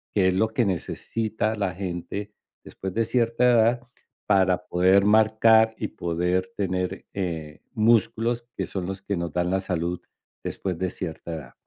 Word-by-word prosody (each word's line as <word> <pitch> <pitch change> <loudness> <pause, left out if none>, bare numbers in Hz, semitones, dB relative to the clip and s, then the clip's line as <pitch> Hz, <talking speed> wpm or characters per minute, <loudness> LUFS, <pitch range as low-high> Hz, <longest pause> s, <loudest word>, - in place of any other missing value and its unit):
que 95 -2 +4
es - - +1
lo 110 +3 +2
que 115 0 +1
necesita 110 +4 -2
la 100 -3 -1
gente 100 +3 -5 0.3
después 95 -1 -6
de 115 0 +2
cierta 120 0 +1
edad 120 0 +4 0.5
para 95 -3 +3
poder 95 +3 +4
marcar, 110 +1 +5
y 105 - -3
poder 90 +2 -1
tener, 95 -1 -2
eh, 80 -6 -4
músculos, 115 +1 +2
que - - -1
son 95 -2 -4
los 95 0 -5
que 100 - -2
nos 85 -2 -3
dan 90 +1 0
la 95 - +2
salud 90 -2 -2 0.4
después 90 -4 -3
de 95 0 -1
cierta 85 -1 -6
edad. 70 -6 -9
95 Hz, 160 wpm, -25 LUFS, 90-110 Hz, 0.5 s, marcar